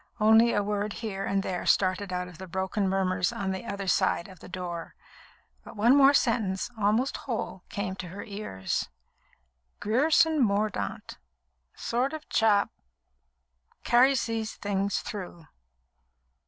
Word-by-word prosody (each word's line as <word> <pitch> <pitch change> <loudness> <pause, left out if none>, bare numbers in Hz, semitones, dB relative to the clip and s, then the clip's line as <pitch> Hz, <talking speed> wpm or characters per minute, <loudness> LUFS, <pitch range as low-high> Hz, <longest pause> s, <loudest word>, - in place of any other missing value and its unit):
Only 220 +2 +6
a 205 - +1
word 205 0 -2
here 200 -4 -4
and 195 0 0
there 180 -2 -3
started 185 0 +2
out 180 0 -2
of 180 -2 -13
the 190 - -8
broken 190 +2 -1
murmurs 185 -1 +1
on 190 -1 -3
the 190 +4 -5
other 200 -1 -4
side 175 -2 +1
of 185 -3 -14
the - - -12
door; 175 -2 -6 0.7
but - - -12
one 235 +5 +5
more 280 0 +6
sentence, 220 -5 +1
almost 220 +5 +1
whole, 225 -6 -4
came 195 -2 -3
to 180 - -6
her 185 +4 -7
ears. 200 - -4 0.9
"Grierson 300 +7 +3
Mordaunt... 210 -1 -2 0.6
sort 250 +5 -1
of 310 -1 -7
chap... 210 -2 +3 1.1
carries 255 +1 +4
these 225 -1 -3
things 200 -1 -1
through." 180 -5 -7
200 Hz, 140 wpm, -28 LUFS, 190-225 Hz, 1.1 s, Only